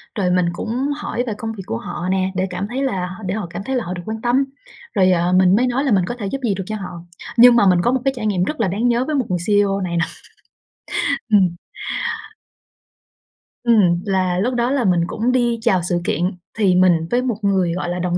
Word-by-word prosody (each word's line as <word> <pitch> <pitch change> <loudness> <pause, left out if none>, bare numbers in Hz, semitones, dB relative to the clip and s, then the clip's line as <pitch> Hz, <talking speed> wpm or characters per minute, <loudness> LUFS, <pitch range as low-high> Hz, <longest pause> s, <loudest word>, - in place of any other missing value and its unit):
rồi 185 -5 0
mình 180 -1 +2
cũng 245 +9 -2
hỏi 245 -4 -3
về 225 - -1
công 225 0 -4
việc 195 - -8
của 115 - -3
họ 175 - -5
nè 190 0 0
để 190 +1 0
cảm 185 +3 -4
thấy 260 +4 -2
là 190 -9 -1
h 185 +4 -9
để 185 +3 -2
họ 205 -6 -4
cảm 175 +3 -6
thấy 265 +5 -2
là 250 - 0
họ 180 - -4
được 175 - -6
quan 220 0 -5
tâm, 250 +3 +2 0.5
rồi, 185 -3 +4
à, 175 0 +2
mình 185 +1 +5
mới 250 +3 +2
nói 250 +3 0
là 275 - 0
mình 185 -3 +3
có 240 - -4
thể 205 - -4
giúp 275 - -3
gì 215 -4 +1
được 190 - -4
cho 215 - -3
họ. 180 -4 -7 0.4
Nhưng 245 0 +8
mà 205 -4 +5
mình 180 -1 +4
có 240 - +2
một 260 - 0
cái 270 - +2
trải 235 -3 -5
nghiệm 185 -4 +1
rất 300 +10 -3
là 225 - +2
đáng 210 +7 0
nhớ 240 +2 +2
với 310 - -2
một 265 -4 +1
người 180 - 0
CEO 200 -1 +2
này 170 -2 -2
nà. 165 - +2 1.3
Ừm. 185 -4 +4 2.1
Ừm, 200 -8 +4
là 185 -2 0
lúc 245 +6 0
đó 240 +1 0
là 275 -3 +1
mình 180 -2 +3
cũng 230 +6 -1
đi 240 -2 +1
chào 195 -6 +2
sự 175 -1 0
kiện 175 +5 0 0.3
thì 195 -4 +3
mình 175 -3 +3
với 245 - +2
một 245 -5 -2
người, 190 -4 +1
gọi 175 -1 -3
là, 180 +1 -3
đồng 175 0 0
200 Hz, 250 wpm, -20 LUFS, 180-240 Hz, 2.1 s, Nhưng